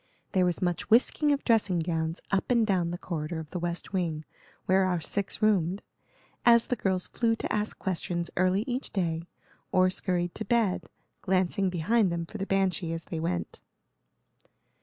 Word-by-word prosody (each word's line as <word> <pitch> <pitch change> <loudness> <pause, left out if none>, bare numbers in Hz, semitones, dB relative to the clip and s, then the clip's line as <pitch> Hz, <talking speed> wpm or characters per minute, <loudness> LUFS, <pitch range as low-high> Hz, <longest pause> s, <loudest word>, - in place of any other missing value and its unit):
There 185 -1 +3
was 175 +1 -1
much 175 -2 -1
whisking 265 +6 +4
of 280 - 0
dressing 215 -6 +2
gowns 165 0 -2
up 195 -1 0
and 235 -3 +4
down 185 -5 +1
the 175 - -3
corridor 165 -2 -4
of 155 -2 -9
the 180 - -3
west 175 +3 -4
wing, 165 -5 -1 0.4
where 190 0 +4
our 180 -2 +1
six 200 +6 -1
roomed, 195 -3 +2 0.6
as 235 -1 +6
the 250 - -1
girls 190 -4 0
flew 230 -1 0
to - - -3
ask 210 0 -1
questions 175 -2 -2
early 185 +3 +2
each 255 +1 -3
day, 170 -3 -1 0.4
or 185 0 +4
scurried 175 -2 -1
to - - -4
bed, 220 -3 +1 0.3
glancing 190 +1 +1
behind 185 +4 +2
them 170 0 -2
for 215 +5 -8
the 195 - -3
banshee 190 -3 0
as 165 0 -5
they 165 - -4
went. 90 - -3
185 Hz, 175 wpm, -28 LUFS, 170-205 Hz, 0.6 s, as